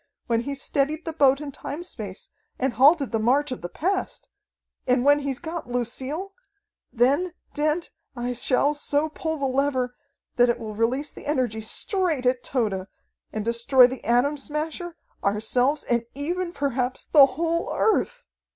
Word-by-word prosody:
When 230 -1 +1
he's 275 +2 -5
steadied 300 +3 -1
the 325 - -3
boat 275 -3 +4
in 290 -1 -5
time 295 +4 -6
space 215 - -8 0.3
and 260 -1 0
halted 280 +2 +5
the 225 - 0
march 265 +6 +2
of 255 - -5
the 175 - -5
past, 375 - -2 0.6
and 250 0 +2
when 290 0 +6
he's 275 -2 -3
got 330 -2 -6
Lucille 265 - -3 0.6
then, 280 +9 +2 0.2
Dent, 305 +3 0 0.2
I 245 0 -2
shall 255 +4 +2
so 295 +1 0
pull 320 +1 -3
the 280 - -2
lever 260 -2 0 0.4
that 245 0 +5
it 235 - +1
will 220 -2 -6
release 245 +7 0
the - - -11
energy 250 -7 0
straight 320 - 0
at 250 0 +2
Tode 205 -7 -1 0.4
and 215 -1 -4
destroy 235 +3 +5
the 255 +1 -3
Atom 250 +5 +2
Smasher, 310 +4 -4 0.3
ourselves, 245 +8 +1
and 235 -1 0
even, 345 +5 -2
perhaps, 260 -5 -2
the 285 -3 +7
whole 335 0 0
Earth!" - - +1
275 Hz, 160 wpm, -25 LUFS, 245-305 Hz, 0.6 s, the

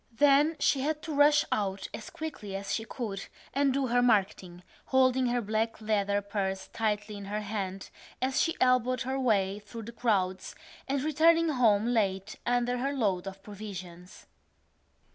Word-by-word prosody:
Then 290 +2 +5
she 285 - +2
had 305 +2 -2
to 320 - -4
rush 290 +1 +5
out 195 -2 -1
as 215 0 -7
quickly 310 -12 -6
as 195 0 -3
she 225 - -2
could 210 -6 -5 0.3
and 275 0 +2
do 275 +1 0
her 245 0 +2
marketing, 195 -6 +1 0.2
holding 260 -1 +3
her 240 0 0
black 220 +2 -1
leather 205 -2 0
purse 195 -2 -3
tightly 210 -1 -1
in 200 - -8
her 210 +2 -3
hand 195 -2 -5 0.3
as 260 +1 +1
she 330 - +1
elbowed 255 -1 +3
her 265 +2 -2
way 205 -5 +1
through 210 +2 -9
the 230 - -8
crowds 195 -6 -1 0.3
and 275 0 -1
returning 325 +2 +4
home 225 -7 +3
late 205 -4 0
under 245 0 +1
her 275 +3 -1
load 200 -8 0
of 195 0 -8
provisions. 185 -4 -9
220 Hz, 160 wpm, -29 LUFS, 200-260 Hz, 0.3 s, Then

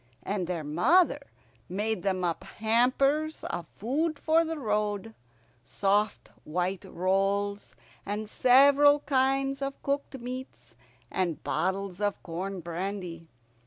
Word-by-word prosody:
And 195 -3 -2
their 175 -3 -3
mother 240 - +3 0.5
made 210 +1 -1
them 185 -1 -1
up 170 -2 -1
hampers 275 +7 +1
of 170 - -4
food 295 - -2
for 325 +2 +3
the 325 0 -3
road, 210 -3 -1 0.5
soft 200 - 0
white 180 +3 -2
rolls, 195 +2 -1 0.3
and 210 +1 -3
several 280 +5 +6
kinds 270 0 +1
of 275 0 -3
cooked 280 -1 -2
meats, 255 +2 -8 0.4
and 175 -4 -1
bottles 190 0 -2
of 205 -1 -1
corn 185 +2 -4
brandy. 170 -1 -5
210 Hz, 115 wpm, -28 LUFS, 185-270 Hz, 0.5 s, several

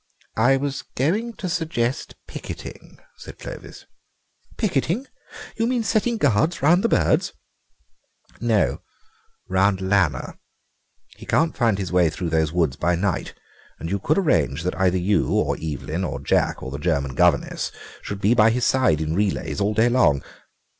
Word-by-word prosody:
"I 135 +4 +4
was 140 0 -3
going 205 - 0
to 195 - -5
suggest 155 -7 -2
picketing," - - -9 0.2
said - - -11
Clovis. - - -10 0.7
"Picketing! 185 - 0 0.5
You 230 - +1
mean 245 -2 0
setting 225 +2 +1
guards 145 - +1
round 175 +6 +4
the 230 - +2
birds?" - - +2 1.1
"No; 115 -3 +1 0.7
round 95 +1 +2
Lanner. 95 -8 0 0.8
He - - -12
can't 160 0 +2
find 115 -5 +2
his 95 -3 -4
way 90 -2 +4
through 85 +1 -4
those 80 -1 +1
woods 80 -6 0
by 90 +2 +1
night, 90 -1 -2 0.4
and 85 - -6
you 100 - 0
could 155 +10 +1
arrange 85 - +1
that 90 +1 +1
you 100 +3 +1
or - - +1
Evelyn 80 +3 -3
or - - -3
Jack - - 0
or 65 - -6
the 70 - -5
German 70 -4 -1
governess - - +1 0.3
should 100 - -6
be 105 +4 +4
by 110 -2 +5
his 120 +2 0
side 130 - +2
in 80 0 -1
relays 100 +2 -1
all 105 +1 +1
day 110 +2 +4
long. 120 - +3
105 Hz, 155 wpm, -23 LUFS, 85-145 Hz, 1.1 s, by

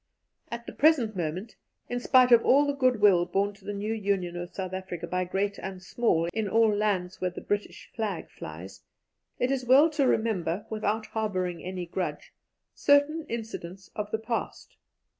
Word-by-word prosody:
At 235 0 -6
the - - -7
present 275 -9 +3
moment, 180 +5 -4 0.3
in 245 - -2
spite 250 0 +5
of 235 -1 +7
all 285 +3 +5
the 285 - 0
good 255 -4 +2
will 190 -4 +6
borne 200 +1 0
to 200 -1 -20
the - - -3
new 205 +2 -2
Union 195 -5 -1
of 175 0 -5
South 185 -1 -5
Africa 185 -3 -5
by 180 +1 -1
great 200 +2 -2
and 190 -1 -6
small 185 -3 0
in 220 -2 -1
all 220 0 +4
lands 190 -3 -1
where 185 - +1
the 180 - -8
British 205 0 -3
flag 210 -6 -3
flies, 85 +5 -9 0.6
it 250 - 0
is 265 -2 0
well 275 +6 +6
to 290 -3 +2
remember, 205 -5 0
without 215 0 -1
harbouring 185 -6 -2
any 185 -1 -4
grudge, 180 +2 -4 0.4
certain 290 +2 +3
incidents 195 -5 -6
of 210 -1 -3
the 220 - -1
past. 225 +1 -4
205 Hz, 180 wpm, -28 LUFS, 185-235 Hz, 0.6 s, of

